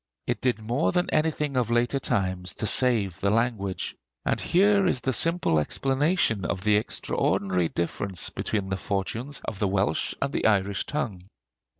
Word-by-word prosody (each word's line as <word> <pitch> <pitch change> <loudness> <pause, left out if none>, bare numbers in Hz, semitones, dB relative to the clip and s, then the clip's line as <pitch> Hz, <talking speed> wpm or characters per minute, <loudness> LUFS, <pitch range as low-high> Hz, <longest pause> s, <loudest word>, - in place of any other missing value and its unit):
It - - -2
did 125 -1 +1
more 120 +7 0
than 180 0 0
anything 150 -2 0
of 125 -3 +1
later 120 +3 +1
time 95 -8 -1 0.2
to - - -2
save 110 -7 +4
the 100 - +1
language; 110 -4 -1 0.3
and - - 0
here 200 +1 +3
is 130 - 0
the 130 +3 -1
simple 165 - +2
explanation 135 - 0
of 90 +2 -3
the 105 -1 +3
extraordinary 95 -4 0
difference 90 +2 -3
between 100 -3 -3
the 95 - -1
fortunes 115 +9 -2
of 100 - -5
the 105 - +1
Welsh 95 -5 0
and 140 0 -2
the - - +1
Irish 100 -2 +1
tongue. 115 -12 -3
110 Hz, 165 wpm, -26 LUFS, 95-135 Hz, 0.3 s, save